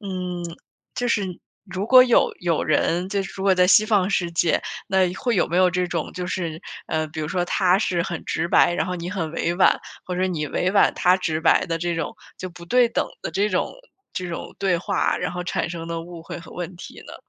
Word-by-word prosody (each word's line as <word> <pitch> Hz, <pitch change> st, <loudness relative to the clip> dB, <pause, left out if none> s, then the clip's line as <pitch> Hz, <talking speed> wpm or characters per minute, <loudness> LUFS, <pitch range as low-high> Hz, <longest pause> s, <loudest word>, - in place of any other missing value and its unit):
嗯， 180 Hz, -3 st, -4 dB, 0.5 s
就 245 Hz, -, -1 dB
是 210 Hz, -4 st, +1 dB, 0.4 s
如 190 Hz, +1 st, -4 dB
果 255 Hz, 0 st, +8 dB
有 245 Hz, -2 st, +4 dB
有 170 Hz, -3 st, 0 dB
人， 170 Hz, +4 st, +1 dB
就 200 Hz, 0 st, -1 dB
是 195 Hz, -, -8 dB
如 190 Hz, -, -6 dB
果 195 Hz, -1 st, +5 dB
在 180 Hz, 0 st, +4 dB
西 200 Hz, +3 st, +6 dB
方 205 Hz, -3 st, +2 dB
世 175 Hz, -3 st, 0 dB
界， 170 Hz, 0 st, +1 dB, 0.3 s
那 190 Hz, -2 st, +3 dB
会 240 Hz, +3 st, -1 dB
有 -, -, +2 dB
没 170 Hz, -, -1 dB
有 185 Hz, 0 st, +5 dB
这 180 Hz, 0 st, 0 dB
种 170 Hz, -3 st, -3 dB
就 180 Hz, 0 st, -4 dB
是， 170 Hz, -4 st, -3 dB, 0.3 s
呃， 155 Hz, 0 st, -1 dB
比 160 Hz, +1 st, -10 dB
如 150 Hz, -, -3 dB
说 180 Hz, 0 st, 0 dB
他 185 Hz, 0 st, +3 dB
是 180 Hz, -5 st, 0 dB
很 175 Hz, -2 st, -5 dB
直 160 Hz, -, -1 dB
白， 175 Hz, 0 st, +4 dB
然 155 Hz, +1 st, -1 dB
后 180 Hz, -, -3 dB
你 170 Hz, 0 st, -5 dB
很 165 Hz, -6 st, -3 dB
委 170 Hz, +1 st, -1 dB
婉， 185 Hz, -, +4 dB, 0.2 s
或 180 Hz, -, -4 dB
者 185 Hz, +1 st, +1 dB
你 160 Hz, -5 st, -2 dB
委 180 Hz, -, 0 dB
婉， 200 Hz, -, +4 dB
他 180 Hz, 0 st, +4 dB
直 160 Hz, -4 st, -2 dB
白 165 Hz, -, +4 dB
的 165 Hz, -2 st, -2 dB
这 175 Hz, 0 st, -1 dB
种， 165 Hz, +7 st, -3 dB, 0.2 s
就 185 Hz, -, -6 dB
不 170 Hz, 0 st, -12 dB
对 245 Hz, +4 st, +4 dB
等 -, -, 0 dB, 0.2 s
的 -, -, -3 dB
这 205 Hz, +2 st, +1 dB
种 185 Hz, -, -1 dB, 0.4 s
这 180 Hz, -1 st, -4 dB
种 170 Hz, -, -6 dB
对 190 Hz, -3 st, +2 dB
话， 190 Hz, +3 st, 0 dB
然 180 Hz, -, -3 dB
后 180 Hz, 0 st, -4 dB
产 175 Hz, -1 st, -2 dB
生 165 Hz, -1 st, -6 dB
的 165 Hz, 0 st, -3 dB
误 170 Hz, -1 st, -10 dB
会 -, -, -7 dB
和 170 Hz, -, -12 dB
问 180 Hz, 0 st, -6 dB
题 180 Hz, -, -11 dB
呢？ -, -, -10 dB
180 Hz, 255 characters per minute, -23 LUFS, 170-190 Hz, 0.5 s, 果